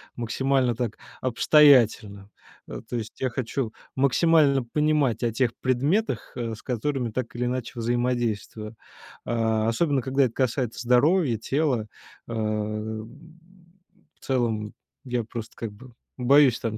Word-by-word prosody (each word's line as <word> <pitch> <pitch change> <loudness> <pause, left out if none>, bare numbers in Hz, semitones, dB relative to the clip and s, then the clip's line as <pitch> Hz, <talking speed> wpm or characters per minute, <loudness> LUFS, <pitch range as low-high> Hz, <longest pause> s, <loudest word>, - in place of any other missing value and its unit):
максимально 125 +1 0
так 115 -2 -3 0.2
обстоятельно. 115 -7 +4 0.4
Э. - - -7
То 125 - -3
есть 110 -1 -7
я 130 - +1
хочу 120 0 -3 0.2
максимально 140 0 +3
понимать 150 -1 +1
о 120 - +1
тех 120 +1 +1
предметах, 140 - 0
э, 115 -3 -3
с 110 - -15
которыми 125 -1 -2
так 125 0 -4
или 125 +1 -1
иначе 125 -1 -3
взаимодействую. 115 -2 -2 0.5
А, 110 -1 0
особенно 140 +4 +1
когда 135 +3 +1
это 115 - -3
касается 125 -2 -1
здоровья, 125 +2 +3
тела, 130 -1 0 0.4
а, 115 - -6
м. 110 +2 -3 1.0
В - - -16
целом 115 -5 -1 0.3
я 125 -2 -1
просто 115 0 -8
как 115 -2 -5
бы 125 +3 -15 0.2
боюсь 130 0 +5
там 110 -2 -3
120 Hz, 130 wpm, -25 LUFS, 110-135 Hz, 1.0 s, боюсь